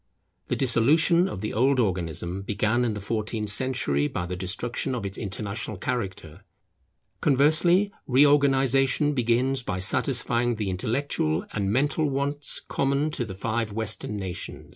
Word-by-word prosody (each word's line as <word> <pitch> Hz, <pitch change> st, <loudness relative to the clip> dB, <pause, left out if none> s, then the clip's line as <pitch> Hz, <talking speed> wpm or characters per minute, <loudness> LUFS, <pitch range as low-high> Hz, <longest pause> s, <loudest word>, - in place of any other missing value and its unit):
The -, -, -1 dB
dissolution 155 Hz, +9 st, +3 dB
of 95 Hz, -, -6 dB
the 105 Hz, -, -3 dB
old 130 Hz, +4 st, +2 dB
organism 90 Hz, -3 st, -1 dB
began 105 Hz, +4 st, 0 dB
in 115 Hz, -3 st, -1 dB
the -, -, -4 dB
fourteenth 105 Hz, +1 st, -2 dB
century 100 Hz, -, +1 dB
by 90 Hz, +2 st, -4 dB
the 90 Hz, +1 st, -4 dB
destruction 115 Hz, +8 st, -3 dB
of 115 Hz, -5 st, -4 dB
its 100 Hz, 0 st, -4 dB
international 105 Hz, 0 st, -4 dB
character. 95 Hz, -8 st, -4 dB, 0.8 s
Conversely, 155 Hz, +8 st, +3 dB, 0.2 s
reorganization 135 Hz, +1 st, +3 dB
begins 125 Hz, +1 st, +1 dB
by 90 Hz, -6 st, -3 dB
satisfying 120 Hz, +4 st, +1 dB
the 105 Hz, -3 st, -2 dB
intellectual 95 Hz, -, -1 dB
and 100 Hz, -2 st, -1 dB
mental 145 Hz, +5 st, +1 dB
wants 140 Hz, +1 st, -2 dB
common 140 Hz, +2 st, 0 dB
to 135 Hz, -6 st, -3 dB
the 95 Hz, -4 st, -8 dB
five 110 Hz, +1 st, -2 dB
Western 110 Hz, -1 st, -2 dB
nations. 95 Hz, -3 st, -6 dB
120 Hz, 140 wpm, -25 LUFS, 100-135 Hz, 0.8 s, dissolution